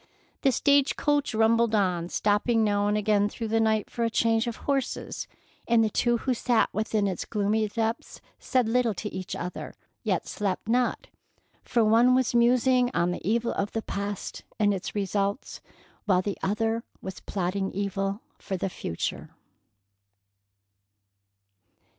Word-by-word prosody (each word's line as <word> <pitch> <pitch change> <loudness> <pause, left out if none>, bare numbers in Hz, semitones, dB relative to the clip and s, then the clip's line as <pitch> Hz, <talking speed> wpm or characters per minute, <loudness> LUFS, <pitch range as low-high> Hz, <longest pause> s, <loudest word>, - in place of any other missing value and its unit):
The 270 - +4
stage 280 +2 +3
coach 290 -5 0
rumbled 225 0 +3
on, 180 -4 +1
stopping 215 +4 +2
now 205 -1 +1
and 210 0 +1
again 205 -1 +2
through 225 +1 -5
the 225 +1 +2
night 220 -2 +2
for 235 - -3
a 230 - +2
change 225 +1 +2
of 235 - -3
horses, 275 -2 -2 0.4
and 235 -1 +4
the 215 - 0
two 240 +2 +2
who 255 +2 -1
sat 240 -1 +2
within 215 -1 0
its 190 -3 -2
gloomy 215 +1 0
depths 225 +2 -3 0.2
said 255 -4 +1
little 235 -2 +1
to 210 +4 -5
each 185 -1 -5
other, 180 +1 -6 0.3
yet - - -1
slept 200 -1 -3
not, 245 +2 +1 0.6
for 235 -2 +2
one 235 +4 +5
was 255 -2 +1
musing 250 +1 +4
on 175 +1 +2
the 180 - -4
evil 230 +6 +1
of 200 +1 -2
the 225 - -2
past 200 0 -5
and 205 -1 +3
its 190 +1 -5
results, 200 +2 -2 0.4
while 185 -3 +3
the 200 0 -3
other 225 +3 0 0.2
was 190 -1 -6
plotting 190 +1 -2
evil 200 +1 -2 0.2
for 190 - -4
the 190 +1 -2
future. 85 - -4
220 Hz, 155 wpm, -27 LUFS, 200-235 Hz, 0.6 s, one